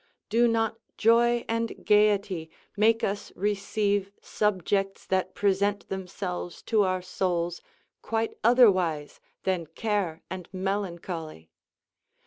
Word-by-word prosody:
Do 235 +2 +4
not 225 -1 0 0.2
joy 235 +1 +4
and 230 0 -2
gayety 205 -5 +3 0.3
make 225 +2 +3
us 200 0 -2
receive 200 0 0
subjects 195 -1 -1
that 185 0 -1
present 200 0 +1
themselves 180 -2 -5
to 220 -2 +2
our 185 -2 0
souls 175 -2 -1 0.4
quite 225 0 -1
otherwise 185 - +4 0.2
than 180 -4 -1
care 185 -1 -2
and 185 -2 -7
melancholy? 175 - -4
195 Hz, 105 wpm, -27 LUFS, 180-215 Hz, 0.4 s, Do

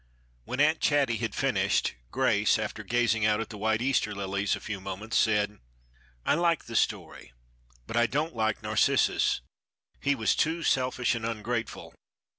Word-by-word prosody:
When 130 - -5
Aunt 155 +2 +4
Chatty 140 -6 +2
had 110 -2 -3
finished, - - +1 0.2
Grace, - - +2
after - - -4
gazing 115 -2 +1
out 105 0 +3
at 115 - -4
the 105 - -8
white 110 +2 +1
Easter 125 -5 +1
lilies 100 0 -1
a - - -8
few 100 -3 -6
moments, 95 +4 -5
said: 105 -2 +2 0.7
"I - - +3
like 170 0 +1
the 115 - -8
story, - - -2 0.5
but 115 - -6
I 120 0 +4
don't 150 +2 -2
like 110 -2 -1
Narcissus. - - +2 0.6
He 140 0 +1
was 110 -4 +1
too 165 +2 0
selfish 125 -2 +1
and 115 -2 -4
ungrateful. 115 +1 -4
115 Hz, 160 wpm, -28 LUFS, 105-130 Hz, 0.7 s, Aunt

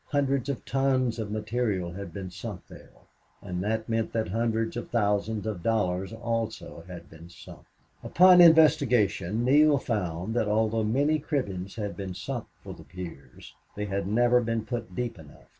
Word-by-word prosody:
Hundreds 140 -2 0
of 140 - -4
tons 130 -3 +1
of 110 -2 -4
material 105 -4 -2
had 100 0 -7
been 95 0 -7
sunk 95 +1 -8
there; - - -14 0.5
and 90 0 -5
that 110 +2 -2
meant 115 -1 -1
that 110 -5 -1
hundreds 115 +2 -1
of 120 - -5
thousands 105 -1 0
of 105 -5 -4
dollars 95 -3 0
also 115 -6 -4
had 85 -2 -10
been 80 +1 -14
sunk. 90 - -14 0.4
Upon 180 0 +6
investigation 125 - +4
Neale 145 +2 +5
found 95 -5 -3
that, 115 -2 0
although 110 +1 +1
many 140 +8 +1
cribbings 100 - -3
had 105 -3 -4
been 95 -2 -6
sunk 90 - -5 0.2
for - - -8
the - - -13
piers, 80 -5 -10 0.2
they 105 - -3
had 100 -2 -3
never 120 +3 +3
been 115 -1 -2
put 120 -6 -5
deep 120 -5 -3
enough. 75 -2 -15
110 Hz, 165 wpm, -27 LUFS, 95-120 Hz, 0.5 s, Upon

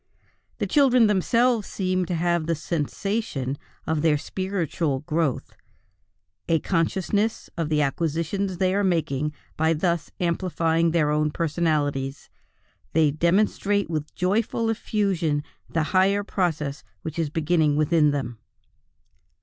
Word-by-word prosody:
The - - -1
children 255 -5 +4
themselves 225 +3 +2
seem 185 -1 -1
to 175 - -1
have 170 -1 0
the 165 - +1
"sensation" 160 - -2 0.3
of 160 -1 0
their 155 -2 +3
spiritual 170 -5 -2
growth, 155 -3 -1 1.0
a 165 - +4
consciousness 190 +6 0
of 165 -3 -2
the 150 -1 +2
acquisitions 165 +6 -1
they 185 0 +2
are 200 +1 +1
making 150 -5 0 0.3
by 160 +1 +3
thus 170 0 0
amplifying 170 -1 +1
their 155 -3 +2
own 150 0 +2
personalities; 150 -4 -1 0.6
they 155 -2 +4
demonstrate 195 +4 +1
with 155 -1 -4
joyous 200 +5 +1
effusion 200 -9 0 0.3
the 165 - 0
higher 195 +2 +3
process 155 -8 -2 0.2
which 160 +1 -5
is 160 -3 0
beginning 155 -1 +2
within 155 0 +3
them. 125 -5 -3
165 Hz, 120 wpm, -25 LUFS, 150-190 Hz, 1.0 s, children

